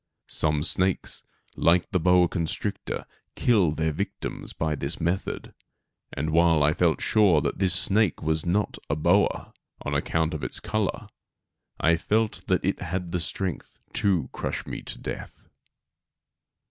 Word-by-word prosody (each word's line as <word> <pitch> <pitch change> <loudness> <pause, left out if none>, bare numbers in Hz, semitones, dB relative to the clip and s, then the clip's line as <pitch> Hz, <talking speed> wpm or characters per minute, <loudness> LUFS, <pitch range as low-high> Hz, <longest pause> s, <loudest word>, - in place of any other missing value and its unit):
Some 75 -1 +1
snakes, 90 +2 +1 0.3
like 85 +1 +3
the 95 - +2
boa 90 +1 +5
constrictor, 85 -2 -3 0.3
kill 105 -9 +3
their 80 +1 0
victims 100 +7 -4
by 80 -1 -1
this 70 -1 -3
method; 90 +4 -2 0.6
and 75 +3 -2
while 80 -2 +4
I 75 +1 +4
felt 85 -1 +2
sure 100 -8 +4
that - - -2
this 95 -2 +2
snake 100 -1 +2
was 80 0 0
not 100 +4 0
a 70 - +1
boa, 85 +6 +2 0.3
on - - -3
account 80 0 0
of 75 - -5
its - - -2
color, 110 -2 -2 0.7
I 85 +1 +4
felt 105 +1 0
that 95 -1 +1
it 95 - 0
had 90 -1 -3
the 90 - 0
strength 90 +2 -4 0.2
to 90 -9 +2
crush - - -3
me - - -5
to - - -4
death. - - -7
85 Hz, 145 wpm, -26 LUFS, 80-95 Hz, 0.7 s, boa